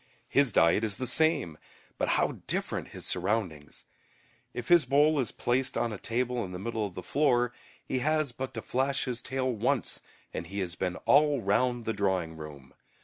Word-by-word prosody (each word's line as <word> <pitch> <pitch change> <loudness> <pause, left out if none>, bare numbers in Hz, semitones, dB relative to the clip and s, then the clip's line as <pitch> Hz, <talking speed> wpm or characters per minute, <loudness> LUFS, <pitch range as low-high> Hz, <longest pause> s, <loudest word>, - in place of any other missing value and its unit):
His 140 -3 +3
diet 85 +4 +4
is 105 -3 -1
the 130 - -2
same, 140 - +1 0.4
but - - +1
how - - 0
different - - 0
his - - -8
surroundings! 90 -6 -2 0.7
If 120 - -6
his 175 -2 +7
bowl 145 +4 +4
is 125 -6 -1
placed 130 +2 0
on 115 -2 0
a - - -5
table 125 +1 -1
in 90 -2 -7
the - - -4
middle 110 +2 -2
of 90 - -13
the 90 - -6
floor, 125 - +2 0.3
he 130 - -1
has 155 0 +1
but 130 +2 -6
to - - -5
flash 135 +2 0
his 125 -3 -3
tail 130 -1 -1
once 110 - 0 0.3
and 85 - -4
he 100 +3 -7
has 90 -2 -3
been 90 0 -2
all 145 -2 +4
round 120 +4 +1
the 110 - 0
drawing 95 -5 -1
room. 75 -4 -10
120 Hz, 190 wpm, -29 LUFS, 95-130 Hz, 0.7 s, his